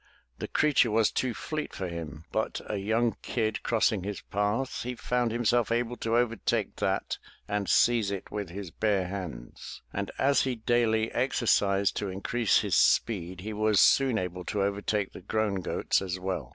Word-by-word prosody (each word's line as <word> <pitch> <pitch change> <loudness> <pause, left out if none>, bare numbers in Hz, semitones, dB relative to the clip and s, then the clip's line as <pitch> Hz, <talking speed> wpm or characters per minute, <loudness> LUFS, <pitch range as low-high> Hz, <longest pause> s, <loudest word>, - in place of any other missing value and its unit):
The - - -4
creature 145 -5 +3
was 110 0 +3
too 125 -3 -1
fleet 155 -1 -4
for 95 - -3
him, 80 -2 -7
but - - -1
a 105 - -3
young 110 +2 0
kid 110 -2 -1
crossing 110 -3 +1
his 100 0 -4
path, 105 +6 -1
he 125 +1 -4
found 125 -1 0
himself 120 0 +1
able 120 +1 0
to 115 +1 0
overtake 115 -3 0
that - - -1 0.3
and 105 -3 -2
seize 115 +2 +4
it 100 -2 -5
with 105 -3 -4
his 95 -1 -7
bare 100 0 +1
hands, 90 -11 -7
and - - -3
as 140 0 +3
he 130 -2 -1
daily 110 -1 +1
exercised 105 -6 +2
to 100 - -2
increase 100 +4 +1
his - - -3
speed, 90 -5 +2
he 110 +3 -5
was 105 -1 +2
soon 135 -4 +5
able 90 -1 -3
to 100 -2 -1
overtake 100 0 -1
the - - -10
grown 100 0 -1
goats 90 - 0
as 95 -1 -3
well. 95 -1 -3
105 Hz, 175 wpm, -28 LUFS, 95-120 Hz, 0.3 s, soon